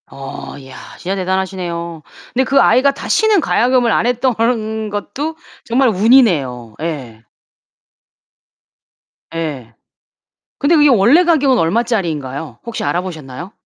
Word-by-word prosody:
어, 135 Hz, 0 st, -8 dB
야. 130 Hz, -, -12 dB, 0.2 s
진짜 190 Hz, +2 st, -3 dB
대단하시네요. 180 Hz, -3 st, -3 dB, 0.3 s
근데 260 Hz, -, +2 dB
그 275 Hz, +1 st, +2 dB
아이가 270 Hz, +1 st, +4 dB
다시는 435 Hz, +7 st, +2 dB
가야금을 245 Hz, -3 st, +2 dB
안 -, -, +1 dB
했던 250 Hz, +1 st, +1 dB, 0.6 s
것도 280 Hz, +10 st, -4 dB, 0.3 s
정말 255 Hz, +2 st, +2 dB
운이네요. 180 Hz, -, +2 dB
예. 135 Hz, -9 st, -5 dB, 2.1 s
예. 140 Hz, -8 st, -5 dB, 0.9 s
근데 300 Hz, +4 st, +2 dB
그게 295 Hz, -1 st, +5 dB
원래 255 Hz, -, +5 dB
가격은 285 Hz, -7 st, +3 dB
얼마짜리인가요? 165 Hz, -, -2 dB
혹시 235 Hz, -, -5 dB
알아보셨나요? 165 Hz, 0 st, -4 dB
195 Hz, 265 characters per minute, -16 LUFS, 155-255 Hz, 2.1 s, 그게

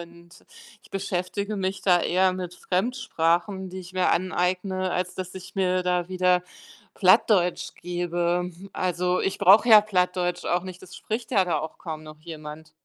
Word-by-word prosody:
und 170 Hz, 0 st, -13 dB, 0.5 s
ich -, -, -21 dB
beschäftige 195 Hz, +2 st, -3 dB
mich 190 Hz, 0 st, -3 dB
da 180 Hz, -2 st, +4 dB
eher 185 Hz, +2 st, +2 dB
mit 180 Hz, -1 st, -6 dB
Fremdsprachen, 190 Hz, -3 st, -1 dB
die 185 Hz, +1 st, -7 dB
ich 180 Hz, 0 st, -12 dB
mir 185 Hz, -1 st, +1 dB
aneigne, 185 Hz, +1 st, 0 dB
als 180 Hz, 0 st, -2 dB
dass 185 Hz, 0 st, -6 dB
ich 185 Hz, -1 st, -10 dB
mir 185 Hz, -1 st, +1 dB
da 180 Hz, -1 st, 0 dB
wieder 180 Hz, -1 st, +2 dB, 0.5 s
Plattdeutsch 180 Hz, -5 st, +3 dB
gebe. 175 Hz, 0 st, -2 dB, 0.2 s
Also, 180 Hz, 0 st, 0 dB
ich 195 Hz, -, -1 dB
brauche 210 Hz, +6 st, +6 dB
ja 215 Hz, -2 st, +9 dB
Plattdeutsch 180 Hz, -3 st, -1 dB
auch 175 Hz, 0 st, +1 dB
nicht, 185 Hz, -1 st, -9 dB
es 185 Hz, -1 st, -12 dB
spricht 225 Hz, +2 st, -5 dB
ja 200 Hz, -6 st, +3 dB
da 170 Hz, -4 st, 0 dB
auch 160 Hz, +1 st, -6 dB
kaum 155 Hz, -2 st, -7 dB
noch 155 Hz, 0 st, -12 dB
jemand. 155 Hz, -1 st, -9 dB
180 Hz, 165 wpm, -25 LUFS, 175-190 Hz, 0.5 s, ja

